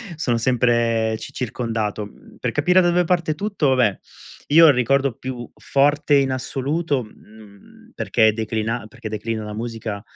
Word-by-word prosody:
sono 125 Hz, -7 st, 0 dB
sempre 115 Hz, -2 st, +1 dB
ci -, -, -10 dB
circondato. 110 Hz, -4 st, -3 dB
Mhmm, 100 Hz, -, -17 dB
per -, -, -2 dB
capire 180 Hz, +6 st, +3 dB
da 175 Hz, -, +2 dB
dove 175 Hz, +1 st, +2 dB
parte 170 Hz, -3 st, 0 dB
tutto, 195 Hz, -6 st, -1 dB
vabbè, 125 Hz, -7 st, +2 dB, 0.5 s
io 165 Hz, +3 st, +7 dB
ho -, -, +8 dB
il -, -, +6 dB
ricordo 135 Hz, +1 st, +1 dB
più 125 Hz, -2 st, -6 dB
forte 145 Hz, +1 st, +2 dB
in 135 Hz, -1 st, +3 dB
assoluto, 140 Hz, +2 st, -2 dB
mhmm, 105 Hz, -2 st, -18 dB
perché 110 Hz, 0 st, +3 dB
declina 110 Hz, +1 st, -3 dB
perché 110 Hz, 0 st, -9 dB
declina 110 Hz, +1 st, -4 dB
la 105 Hz, 0 st, -7 dB
musica, 115 Hz, -2 st, -5 dB
120 Hz, 160 wpm, -21 LUFS, 110-145 Hz, 0.5 s, ho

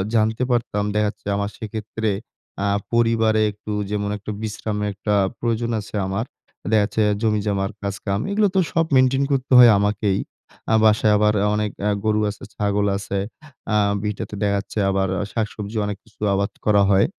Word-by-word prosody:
জানতে 110 Hz, +2 st, +2 dB
পারতাম 115 Hz, -4 st, 0 dB
দেখাচ্ছে 105 Hz, -1 st, -1 dB
আমার 100 Hz, 0 st, -1 dB
সেক্ষেত্রে 110 Hz, 0 st, -4 dB, 0.6 s
আ -, -, +1 dB, 0.3 s
পরিবারে 115 Hz, -2 st, +3 dB
একটু 105 Hz, +1 st, -9 dB, 0.2 s
যেমন 105 Hz, -1 st, -1 dB
একটু 105 Hz, +1 st, -6 dB
বিশ্রামের 105 Hz, -1 st, -3 dB
একটা 105 Hz, +2 st, -2 dB, 0.3 s
প্রয়োজন 115 Hz, 0 st, -1 dB
আছে 105 Hz, -, -10 dB
আমার। 100 Hz, +4 st, -2 dB, 0.5 s
দেখাচ্ছে 105 Hz, 0 st, +2 dB, 0.2 s
জমিজমার 105 Hz, -2 st, 0 dB
কাজকাম, 100 Hz, 0 st, -2 dB
এগুলো 210 Hz, +1 st, +3 dB
তো -, -, +5 dB
সব 165 Hz, -2 st, +2 dB
মেইনটেইন 130 Hz, +1 st, +4 dB
করতে 135 Hz, -1 st, -1 dB
হয় 120 Hz, -2 st, +9 dB
আমাকেই। 105 Hz, -1 st, +1 dB, 0.5 s
আ -, -, +6 dB
বাসায় 105 Hz, 0 st, +4 dB
আবার 105 Hz, 0 st, +3 dB, 0.2 s
অনেক 105 Hz, -1 st, -1 dB, 0.2 s
আ -, -, +3 dB, 0.2 s
গরু 110 Hz, 0 st, +2 dB
আছে, 100 Hz, -, -8 dB
ছাগল 100 Hz, -1 st, 0 dB
আছে, 100 Hz, 0 st, -3 dB, 0.6 s
আ -, -, +4 dB, 0.3 s
ভিটাতে 105 Hz, 0 st, -4 dB
দেখাচ্ছে 100 Hz, +1 st, -1 dB
আবার 95 Hz, 0 st, +1 dB, 0.3 s
শাকসবজি 105 Hz, -1 st, -3 dB
অনেক 105 Hz, -1 st, -3 dB
কিছু 105 Hz, -2 st, -26 dB
আবাদ 100 Hz, +1 st, 0 dB
করা 105 Hz, -1 st, +4 dB
হয়। 95 Hz, 0 st, +5 dB
105 Hz, 155 wpm, -22 LUFS, 100-110 Hz, 0.6 s, হয়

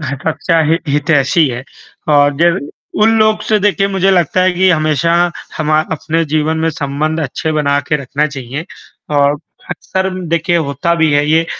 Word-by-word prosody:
सच्चा 160 Hz, +4 st, -1 dB
हि 165 Hz, -, +3 dB
हितैषी 145 Hz, +1 st, +2 dB
है 120 Hz, 0 st, -5 dB, 0.5 s
और 145 Hz, 0 st, +3 dB
जब 170 Hz, +2 st, +3 dB, 0.4 s
उन 225 Hz, +1 st, +4 dB
लोगों 215 Hz, 0 st, +3 dB
से 215 Hz, -1 st, +3 dB
देखिए 200 Hz, -1 st, +1 dB
मुझे 195 Hz, -1 st, +1 dB
लगता 180 Hz, 0 st, +2 dB
है 185 Hz, 0 st, +3 dB
कि 185 Hz, +1 st, +3 dB
हमेशा 155 Hz, -1 st, +1 dB, 0.4 s
हम 155 Hz, -1 st, -2 dB
अ, 155 Hz, 0 st, +4 dB
अपने 160 Hz, +1 st, -1 dB
जीवन 155 Hz, +1 st, 0 dB
में 160 Hz, +1 st, 0 dB
संबंध 155 Hz, +1 st, -2 dB
अच्छे 155 Hz, +3 st, -3 dB
बनाकर 145 Hz, -1 st, 0 dB
रखना 140 Hz, +3 st, -1 dB
चाहिए 140 Hz, +2 st, -6 dB, 0.5 s
और 145 Hz, +1 st, +3 dB, 0.3 s
अक्सर 190 Hz, 0 st, -2 dB, 0.2 s
देखिए 170 Hz, +1 st, +1 dB
होता 160 Hz, +2 st, -1 dB
भी 160 Hz, -2 st, +2 dB
है 145 Hz, 0 st, +2 dB
ये 165 Hz, +1 st, +3 dB
160 Hz, 165 wpm, -14 LUFS, 145-170 Hz, 0.5 s, उन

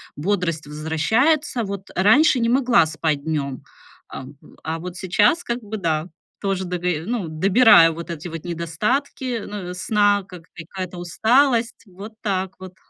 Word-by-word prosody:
Бодрость 170 Hz, -2 st, -2 dB
возвращается. 225 Hz, -, 0 dB
Вот, 195 Hz, -1 st, -7 dB
а -, -, +1 dB
раньше 260 Hz, +6 st, +5 dB
не 230 Hz, -, +1 dB
могла 245 Hz, -8 st, +4 dB
спать 155 Hz, -2 st, -2 dB
днём, 140 Hz, -5 st, -3 dB, 0.5 s
ам, 135 Hz, +2 st, -10 dB
в -, -, -19 dB
а, 160 Hz, +1 st, -3 dB
вот 180 Hz, +1 st, -7 dB
сейчас, 205 Hz, -, +2 dB
как 235 Hz, -4 st, -3 dB
бы 215 Hz, 0 st, -7 dB
да, 165 Hz, -5 st, -1 dB, 0.3 s
тоже 195 Hz, -2 st, -2 dB
дого 180 Hz, 0 st, -4 dB
э, 165 Hz, -3 st, 0 dB
ну, 230 Hz, -5 st, -2 dB
добираю 170 Hz, 0 st, +5 dB
вот 170 Hz, +1 st, -7 dB
эти 165 Hz, 0 st, -6 dB
вот 165 Hz, 0 st, -8 dB
недостатки, 215 Hz, -, -2 dB
ну, 200 Hz, -4 st, -6 dB
у -, -, -6 dB
сна, 205 Hz, +2 st, +2 dB
как 180 Hz, -3 st, -12 dB
какая-то 180 Hz, +2 st, -7 dB
усталость, 230 Hz, +7 st, +1 dB
вот 200 Hz, +4 st, -11 dB
так 190 Hz, -3 st, -2 dB
вот. 185 Hz, -1 st, -11 dB
185 Hz, 165 wpm, -21 LUFS, 165-220 Hz, 0.5 s, раньше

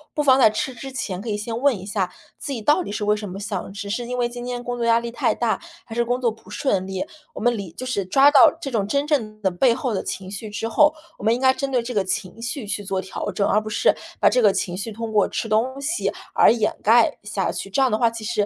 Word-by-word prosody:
不 300 Hz, -, +1 dB
妨 265 Hz, -2 st, +5 dB
在 235 Hz, -, +7 dB
吃 235 Hz, +5 st, -3 dB
之 265 Hz, +3 st, -8 dB
前 200 Hz, -8 st, -4 dB
可 230 Hz, -, -6 dB
以 210 Hz, -, -1 dB
先 225 Hz, +2 st, -4 dB
问 280 Hz, -5 st, +3 dB
一 185 Hz, -, -9 dB
下， 195 Hz, -3 st, -1 dB, 0.3 s
自 290 Hz, -, -5 dB
己 235 Hz, -5 st, -4 dB
到 300 Hz, -, +4 dB
底 345 Hz, -, -5 dB
是 210 Hz, -, -3 dB
为 210 Hz, 0 st, +3 dB
什 210 Hz, -1 st, -6 dB
么 190 Hz, +2 st, -7 dB
想？ 200 Hz, -, -4 dB
只 200 Hz, 0 st, -5 dB
是 240 Hz, +3 st, -2 dB
因 250 Hz, +1 st, -3 dB
为 245 Hz, -1 st, +1 dB
今 240 Hz, 0 st, -8 dB
天 245 Hz, 0 st, -4 dB
工 245 Hz, 0 st, -3 dB
作 235 Hz, -1 st, -1 dB
压 230 Hz, 0 st, +5 dB
力 235 Hz, 0 st, -5 dB
太 240 Hz, -, 0 dB
大？ 235 Hz, -2 st, 0 dB, 0.2 s
还 225 Hz, -, -9 dB
是 235 Hz, +1 st, +1 dB
工 245 Hz, +1 st, -1 dB
作 240 Hz, -3 st, +1 dB
不 225 Hz, +1 st, -16 dB
顺 195 Hz, -9 st, -1 dB
利？ 190 Hz, -1 st, -3 dB, 0.3 s
我 -, -, -6 dB
们 240 Hz, +2 st, +2 dB
理 200 Hz, -6 st, -6 dB
就 255 Hz, -, -7 dB
是 255 Hz, -6 st, -1 dB
抓 270 Hz, +10 st, +5 dB
到 280 Hz, -3 st, +8 dB
这 280 Hz, -5 st, -5 dB
种 205 Hz, -4 st, 0 dB
真 280 Hz, +5 st, 0 dB
正 225 Hz, -9 st, -1 dB
的 190 Hz, -, +2 dB
背 230 Hz, +7 st, +3 dB
后 255 Hz, -2 st, -2 dB
的 195 Hz, -, -1 dB
情 190 Hz, 0 st, -5 dB
绪 210 Hz, +2 st, -6 dB
之 220 Hz, +2 st, -3 dB
后， 295 Hz, +6 st, +5 dB, 0.3 s
我 -, -, -10 dB
们 225 Hz, +2 st, +3 dB
应 -, -, -4 dB
该 260 Hz, 0 st, +4 dB
针 275 Hz, +1 st, -3 dB
对 250 Hz, -3 st, +1 dB
这 250 Hz, +1 st, -5 dB
个 205 Hz, -3 st, +1 dB
情 185 Hz, +3 st, -4 dB
绪 245 Hz, +1 st, -4 dB
去 205 Hz, 0 st, -3 dB
做 195 Hz, -1 st, -2 dB
调 190 Hz, -, -5 dB
整， 200 Hz, -, 0 dB
而 210 Hz, -, +3 dB
不 215 Hz, -, -6 dB
是， 215 Hz, -, +3 dB, 0.2 s
把 -, -, +4 dB
这 250 Hz, -, +3 dB
个 210 Hz, -3 st, +6 dB
情 180 Hz, -2 st, -2 dB
绪 205 Hz, +4 st, -4 dB
通 225 Hz, +1 st, -5 dB
过 210 Hz, -, +4 dB
吃 -, -, -3 dB
东 235 Hz, +5 st, 0 dB
西 315 Hz, +5 st, -1 dB, 0.2 s
而 -, -, +6 dB
掩 225 Hz, -2 st, 0 dB
盖 225 Hz, +2 st, +4 dB
下 210 Hz, -2 st, -2 dB
去。 195 Hz, -, -5 dB
这 195 Hz, -, -1 dB
样 260 Hz, -2 st, +3 dB
的 215 Hz, -, +2 dB
话 235 Hz, -, +4 dB
其 230 Hz, -1 st, -8 dB
实 215 Hz, -, -3 dB
230 Hz, 315 characters per minute, -22 LUFS, 205-250 Hz, 0.3 s, 到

